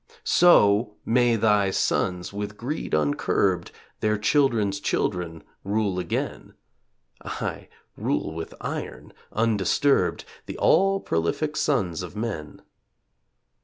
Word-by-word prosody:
So 105 -11 +5
may 120 0 +3
thy 105 -2 +3
sons, 90 -1 -1
with 105 +1 -5
greed 130 - -3
uncurbed, 85 +4 +1 0.3
Their 105 0 +1
children's 105 -5 +2
children 85 -4 -2 0.2
rule 100 -2 0
again; - - -4 0.7
Aye, - - -5 0.3
rule 75 - -2
with 80 0 -7
iron, - - -6 0.2
undisturbed, 115 +5 +1 0.2
The - - -6
all 195 +3 +3
prolific 85 - -1
sons 95 - 0
of 90 +2 -8
men. 105 -9 -5
105 Hz, 100 wpm, -25 LUFS, 90-120 Hz, 0.7 s, So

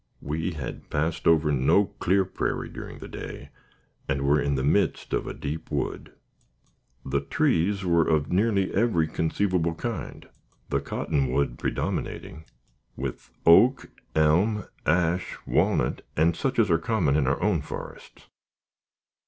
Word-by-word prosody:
We 80 +5 -2
had 70 -5 -7
passed 80 +3 -1
over 80 -2 +4
no 70 +9 +4
clear 95 +2 +2
prairie 95 - -3
during - - -8
the - - -9
day, - - -8 0.6
and 70 0 0
were 70 +1 +3
in 70 0 0
the 65 - -1
midst 100 +9 +1
of - - -1
a - - -4
deep 80 +3 -5
wood. - - -3 0.9
The - - 0
trees 95 +4 +1
were 85 -2 +3
of 75 -2 +1
nearly 100 0 +2
every 95 -7 +2
conceivable 85 +1 0
kind 105 - -5 0.4
the - - +1
cottonwood 65 -2 -1
predominating, 80 +1 -3 0.5
with 65 -1 -5 0.2
oak, 120 +11 +5 0.2
elm, 90 +8 +3 0.2
ash, 85 +2 +1
walnut, - - +1 0.2
and 80 +2 +3
such 135 - -2
as 110 -5 +3
are 80 - +4
common 85 -7 +1
in 75 -4 +2
our 70 - +1
own 95 -5 +1
forests. - - -9
80 Hz, 135 wpm, -26 LUFS, 75-95 Hz, 0.9 s, oak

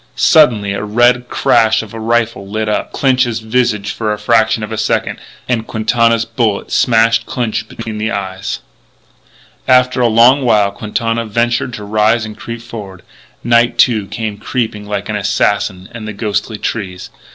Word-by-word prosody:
Suddenly 110 -10 +4
the 100 - -3
red 120 +3 +2
crash 110 0 +2
of 110 - -12
a 115 - -6
rifle 115 -3 -1
lit 110 +1 -2
up 105 - -2
Clinch's 130 -4 +1
visage 110 -2 0
for 110 -2 -2
a 105 - -2
fraction 110 0 +2
of 105 - -6
a 110 - -3
second. - - -1 0.3
And 115 -3 -1
Quintana's 115 +1 +1
bullet 115 -3 -1
smashed 115 -1 +3
Clinch 110 -3 -2
between 110 -2 -7
the 110 +1 -1
eyes. 95 -3 -4 1.1
After 125 0 +3
a 120 - +4
long 120 +5 +5
while 105 -5 +3
Quintana 115 +3 -2
ventured 120 +2 0
to 105 - -8
rise 110 +2 +1
and 110 0 -8
creep 115 +1 -8
forward. 100 -6 -9 0.4
Night, 120 0 +3
too, 110 -5 +3
came 110 -2 -5
creeping 105 -3 -3
like 100 -1 -3
an 105 - -3
assassin 100 -2 0
amid 110 -2 -7
the 110 - -5
ghostly 110 0 -2
trees. 95 -5 -5
110 Hz, 165 wpm, -15 LUFS, 105-120 Hz, 1.1 s, long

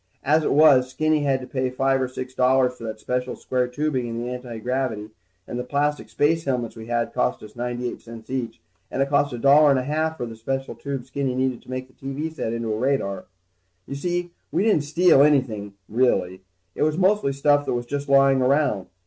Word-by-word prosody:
As 155 +3 +3
it - - 0
was, 140 -4 +6
Skinny 155 +3 +1
had 135 -2 +1
to - - -7
pay 130 -1 -1
five 135 +1 +1
or 130 - 0
six 130 0 -7
dollars 130 0 +3
for 115 - -12
that 110 -1 -5
special 125 +3 -2
square 125 -1 -1
tubing 130 -1 -2
in 115 0 -5
the 120 +1 -3
antigravity, 125 -2 -3 0.4
and 120 - -4
the - - -2
plastic 145 +3 -1
space 160 +3 +1
helmets 125 -4 -2
we 110 -1 -9
had 120 0 -1
cost 60 +6 -1
us 105 0 -12
ninety 120 0 -3
eight - - -6
cents 115 -1 -11
each. 130 -3 -4 0.3
And 135 - 0
it 140 - -5
cost 145 0 +2
a 120 - -5
dollar 145 +4 +6
and 135 - +4
a 130 - -1
half 155 +3 -1
for 120 - -3
the 115 -1 -8
special 135 +4 -3
tube 140 -2 -5
that - - -18
Skinny 135 -1 -2
needed 130 -1 -1
to - - -19
make 130 0 -4
the 130 - -25
TV 140 +5 -5
set 115 - -3
into 115 -1 -2
a 105 - -3
radar. 130 -7 -1 0.6
You - - -7
see, 175 +4 -2 0.2
we - - +1
didn't 205 -10 +2
steal 165 -1 +5
anything, 120 -9 +2
really. 95 -6 +1 0.3
It - - -6
was 155 +1 +2
mostly 190 -5 +2
stuff 145 +1 +2
that - - 0
was 120 0 -3
just 140 +3 -4
lying 135 -1 +5
around. 130 -7 +1
130 Hz, 225 wpm, -23 LUFS, 120-145 Hz, 0.6 s, was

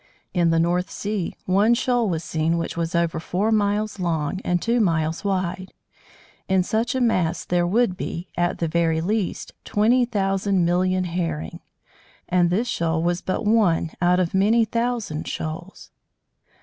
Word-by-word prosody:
In 175 -2 +2
the 165 - +2
North 175 +2 +1
Sea, 205 -4 -3
one 205 +5 +3
shoal 245 -3 +1
was 165 -2 -2
seen 160 +1 0
which 165 - -3
was 170 0 -2
over 170 -1 +1
four 190 +7 -1
miles 210 0 0
long 170 +1 -1
and 175 0 +1
two 235 +5 +1
miles 165 -5 0
wide. 185 -1 -2 0.8
In 190 -1 +3
such 225 +6 -1
a - - +1
mass 185 -9 +1
there 175 -1 +1
would 200 -1 +1
be, 175 -2 -5
at 175 0 0
the 165 - -1
very 165 0 +1
least, 200 +3 -2
twenty 240 +4 +3
thousand 195 -4 0
million 185 +2 +1
Herring; 165 - -3 0.7
and 175 -1 +3
this 215 +8 0
shoal 165 -4 -1
was 175 +1 0
but 190 - -2
one 205 -7 +2
out 180 +1 +3
of 180 -2 0
many 215 +4 +3
thousand 230 -8 -2
shoals. 165 +4 -6
180 Hz, 160 wpm, -23 LUFS, 170-210 Hz, 0.8 s, one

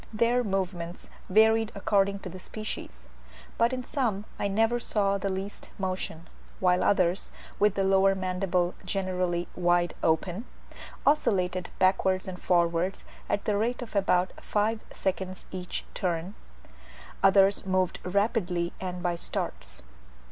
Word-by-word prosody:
Their 235 +3 +2
movements 185 -4 -3 0.2
varied 220 +2 +4
according 200 0 +1
to 185 - -6
the 185 +2 -9
species; 65 - -7 0.5
but 230 +2 +4
in 255 -1 -3
some 225 -8 -1
I - - +1
never 225 +4 +2
saw 200 -4 +1
the 195 - -1
least 195 +2 -5
motion; 185 -3 -4 0.3
while 180 -1 +3
others, 185 -1 +2 0.3
with 210 -1 +4
the 195 - +1
lower 195 0 +4
mandible 185 -1 0
generally 185 -2 -1
wide 175 -1 +2
open, 175 +7 0 0.6
oscillated 185 -11 +2
backwards 185 0 +2
and 180 -1 -6
forwards 175 +1 +1 0.3
at 205 - 0
the 210 -1 +1
rate 240 +4 0
of 225 - -11
about 185 -2 +3
five 215 +2 +1
seconds 190 0 -3
each 180 -1 -5
turn, 180 -1 -2 0.9
others 195 0 +5
moved 185 -1 +1
rapidly 180 -3 0
and 180 -1 -4
by 175 -1 +1
starts. 65 - -5
190 Hz, 130 wpm, -28 LUFS, 180-205 Hz, 0.9 s, others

